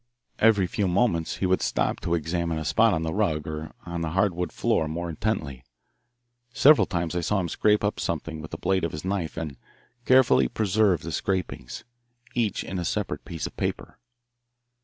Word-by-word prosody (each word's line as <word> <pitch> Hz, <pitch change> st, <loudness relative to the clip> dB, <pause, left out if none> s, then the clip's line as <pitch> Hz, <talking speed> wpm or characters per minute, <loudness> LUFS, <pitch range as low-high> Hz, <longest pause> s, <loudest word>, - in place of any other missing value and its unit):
Every 105 Hz, -4 st, +5 dB
few 100 Hz, +1 st, -1 dB
moments 90 Hz, -3 st, +1 dB
he -, -, -2 dB
would 95 Hz, 0 st, +2 dB
stop -, -, 0 dB
to 85 Hz, -, 0 dB
examine 85 Hz, 0 st, -1 dB
a 80 Hz, -, -4 dB
spot 105 Hz, +7 st, +4 dB
on 80 Hz, -, -2 dB
the 80 Hz, 0 st, -2 dB
rug 80 Hz, -8 st, 0 dB
or 80 Hz, 0 st, -5 dB
on 85 Hz, -1 st, -4 dB
the 80 Hz, -, -1 dB
hardwood 90 Hz, -3 st, +1 dB
floor 80 Hz, -, +1 dB
more 85 Hz, +2 st, -4 dB
intently. 75 Hz, -, -3 dB, 0.9 s
Several 140 Hz, +3 st, +6 dB
times 85 Hz, -1 st, -2 dB
I 90 Hz, -, 0 dB
saw 95 Hz, +4 st, +1 dB
him 90 Hz, -, -1 dB
scrape 105 Hz, +5 st, +2 dB
up 105 Hz, -, 0 dB
something 80 Hz, -1 st, -3 dB
with 80 Hz, -, -8 dB
the -, -, -6 dB
blade 95 Hz, -2 st, 0 dB
of 85 Hz, -, -2 dB
his 75 Hz, +4 st, -6 dB
knife 95 Hz, -5 st, -2 dB
and 75 Hz, -4 st, -5 dB, 0.5 s
carefully 130 Hz, -1 st, +5 dB
preserve 100 Hz, -5 st, +1 dB
the 85 Hz, -, -5 dB
scrapings, 90 Hz, -10 st, -3 dB, 0.5 s
each 115 Hz, -5 st, 0 dB
in 95 Hz, -, -4 dB
a -, -, -2 dB
separate -, -, -3 dB
piece 80 Hz, -2 st, -5 dB
of -, -, -7 dB
paper. -, -, -4 dB
85 Hz, 185 wpm, -26 LUFS, 80-100 Hz, 0.9 s, Several